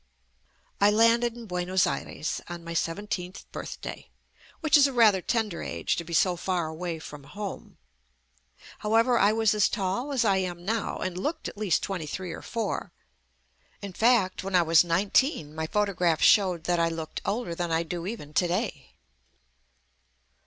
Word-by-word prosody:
I 200 Hz, -, +6 dB
landed 230 Hz, +2 st, +3 dB
in 235 Hz, -, -9 dB
Buenos 180 Hz, -1 st, +1 dB
Aires 155 Hz, -, -3 dB
on 175 Hz, -1 st, -7 dB
my 170 Hz, 0 st, -6 dB
seventeenth 180 Hz, +2 st, -3 dB
birthday, -, -, -7 dB, 0.5 s
which 310 Hz, -3 st, +3 dB
is 285 Hz, -1 st, +7 dB
a 275 Hz, -, -5 dB
rather 215 Hz, -6 st, +5 dB
tender 215 Hz, -4 st, -1 dB
age -, -, -2 dB
to 170 Hz, -, -2 dB
be 170 Hz, -, -11 dB
so 180 Hz, +1 st, +3 dB
far 175 Hz, -1 st, -1 dB
away 165 Hz, +1 st, -4 dB
from 150 Hz, -2 st, -10 dB
home. 195 Hz, +7 st, -7 dB, 1.0 s
However, 230 Hz, +3 st, +3 dB
I 200 Hz, +2 st, +5 dB
was 220 Hz, -1 st, +2 dB
as 210 Hz, -1 st, +3 dB
tall 205 Hz, +7 st, -2 dB
as 255 Hz, -4 st, +1 dB
I 195 Hz, -2 st, +3 dB
am 175 Hz, -2 st, -3 dB
now 225 Hz, +1 st, -1 dB
and 185 Hz, -1 st, -4 dB
looked 315 Hz, -, -3 dB
at -, -, -8 dB
least 200 Hz, -6 st, 0 dB
twenty 180 Hz, -6 st, -3 dB
three 180 Hz, +3 st, -5 dB
or -, -, -7 dB
four. 230 Hz, -2 st, -3 dB, 0.9 s
In 200 Hz, -2 st, -6 dB
fact, 220 Hz, -4 st, +2 dB
when 195 Hz, 0 st, -2 dB
I 175 Hz, -, +5 dB
was 165 Hz, 0 st, +5 dB
nineteen 180 Hz, -, +1 dB
my 160 Hz, 0 st, -3 dB
photographs 180 Hz, -5 st, +1 dB
show 190 Hz, -4 st, +5 dB
that 170 Hz, +1 st, -1 dB
I 165 Hz, 0 st, +2 dB
looked 165 Hz, -1 st, -5 dB
older 205 Hz, -4 st, -2 dB
than 175 Hz, 0 st, -3 dB
I 165 Hz, +1 st, +1 dB
do 170 Hz, +1 st, -5 dB
even 195 Hz, -9 st, -7 dB
to 175 Hz, -, +2 dB
day. 175 Hz, -, -3 dB
185 Hz, 170 wpm, -27 LUFS, 170-220 Hz, 1.0 s, is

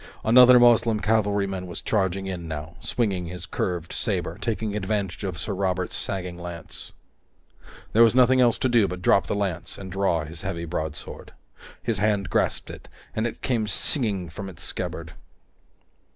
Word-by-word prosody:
Another 125 Hz, +2 st, +8 dB
Moslem 115 Hz, -2 st, +5 dB
cavalryman 100 Hz, -4 st, 0 dB
was 85 Hz, -, -6 dB
charging 95 Hz, -2 st, 0 dB
in 90 Hz, -3 st, -5 dB
now, 80 Hz, +2 st, -6 dB
swinging 95 Hz, -8 st, -1 dB
his 90 Hz, +1 st, -7 dB
curved 85 Hz, -1 st, -3 dB
saber, 85 Hz, -, -1 dB
taking 110 Hz, -2 st, -2 dB
advantage 100 Hz, -2 st, -2 dB
of 95 Hz, -4 st, -3 dB
Sir 105 Hz, -, -3 dB
Robert's 95 Hz, -1 st, -1 dB
sagging 90 Hz, -2 st, -2 dB
lance. 85 Hz, -1 st, -8 dB, 1.0 s
There 115 Hz, -, +5 dB
was 115 Hz, +1 st, +6 dB
nothing 130 Hz, 0 st, +5 dB
else 120 Hz, -2 st, +4 dB
to -, -, +1 dB
do 120 Hz, -5 st, +4 dB
but 90 Hz, 0 st, -6 dB
drop 100 Hz, -, +4 dB
the -, -, -1 dB
lance 95 Hz, -5 st, -3 dB
and 95 Hz, -1 st, -8 dB
draw 95 Hz, -4 st, +1 dB
his 80 Hz, +1 st, -8 dB
heavy 85 Hz, -3 st, -4 dB
broadsword. 80 Hz, -2 st, -5 dB, 0.5 s
His 115 Hz, -4 st, -1 dB
hand 105 Hz, -1 st, +1 dB
grasped -, -, 0 dB
it, -, -, -11 dB, 0.3 s
and 110 Hz, +2 st, 0 dB
it -, -, -8 dB
came 115 Hz, -4 st, 0 dB
singing 105 Hz, -, -1 dB
from 95 Hz, +4 st, -7 dB
its 80 Hz, -3 st, -9 dB
scabbard. -, -, -5 dB
95 Hz, 165 wpm, -25 LUFS, 90-110 Hz, 1.0 s, Another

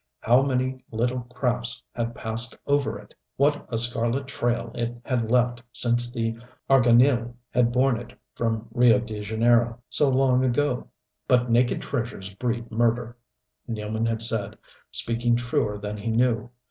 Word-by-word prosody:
How 120 Hz, +3 st, +5 dB
many 130 Hz, -1 st, -1 dB
little 120 Hz, +3 st, -1 dB
crafts 125 Hz, -2 st, -2 dB
had 115 Hz, -1 st, -3 dB
passed 115 Hz, +2 st, -3 dB
over 140 Hz, -5 st, +1 dB
it! 105 Hz, 0 st, -15 dB, 0.2 s
What 145 Hz, +2 st, +1 dB
a 115 Hz, -, 0 dB
scarlet 120 Hz, +3 st, +1 dB
trail 120 Hz, -3 st, -2 dB
it 120 Hz, 0 st, -3 dB
had 120 Hz, -4 st, -1 dB
left 120 Hz, 0 st, +2 dB
since 120 Hz, 0 st, +1 dB
the 115 Hz, -2 st, -2 dB, 0.3 s
Arganil 120 Hz, -1 st, +4 dB, 0.2 s
had 120 Hz, -1 st, +2 dB
borne 125 Hz, -1 st, +2 dB
it 120 Hz, -, -12 dB
from 115 Hz, -1 st, -2 dB
Rio 120 Hz, 0 st, +5 dB
de 110 Hz, -4 st, -5 dB
Janeiro, 115 Hz, +2 st, +2 dB
so 145 Hz, -, +3 dB
long 130 Hz, -1 st, +3 dB
ago. 130 Hz, +1 st, 0 dB, 0.4 s
"But 125 Hz, -1 st, +3 dB
naked 120 Hz, +1 st, +2 dB
treasures 115 Hz, -7 st, -4 dB
breed 120 Hz, +2 st, -3 dB
murder!" 120 Hz, +1 st, 0 dB, 0.5 s
Nealman 110 Hz, 0 st, -2 dB
had 115 Hz, 0 st, 0 dB
said 110 Hz, -2 st, 0 dB, 0.3 s
speaking 120 Hz, +1 st, +1 dB
truer 120 Hz, -3 st, -1 dB
than 105 Hz, +1 st, -5 dB
he 105 Hz, -, -6 dB
knew.... 115 Hz, 0 st, +1 dB
120 Hz, 145 wpm, -25 LUFS, 115-125 Hz, 0.5 s, How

